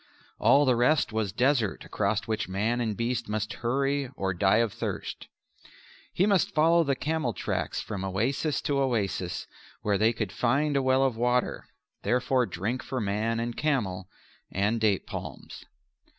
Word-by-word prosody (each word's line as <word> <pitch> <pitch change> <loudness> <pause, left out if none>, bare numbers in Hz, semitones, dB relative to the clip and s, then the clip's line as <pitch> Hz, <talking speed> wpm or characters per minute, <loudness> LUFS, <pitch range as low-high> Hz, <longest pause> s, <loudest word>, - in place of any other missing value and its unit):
All 145 +1 +5
the 130 -2 +4
rest 125 0 +2
was 110 -3 -1
desert 125 -3 +1
across 100 +1 0
which 110 -4 -2
man 110 +6 0
and 110 -3 -2
beast 120 0 -2
must 110 +2 -2
hurry 135 +3 0
or 95 -4 -1
die 95 +3 +3
of 115 -3 +1
thirst. - - -5 0.8
He 185 - +2
must 200 -4 +2
follow 165 +2 +5
the 140 -3 0
camel 155 -4 -1
tracks - - -2
from 100 -2 -5
oasis 120 - 0
to 145 -3 0
oasis, 100 -9 -1 0.4
where 100 -2 +1
they 110 +2 +4
could 110 -4 -3
find 140 +7 +1
a 140 - +3
well 130 0 +3
of 130 -4 0
water, 125 +1 0 0.3
therefore 125 0 +1
drink 105 +8 -3
for 130 - -4
man 110 +2 -1
and 120 0 -3
camel, 100 -12 -1 0.4
and 105 +4 0
date 105 -3 +2
palms. - - -8
120 Hz, 160 wpm, -28 LUFS, 105-135 Hz, 0.8 s, All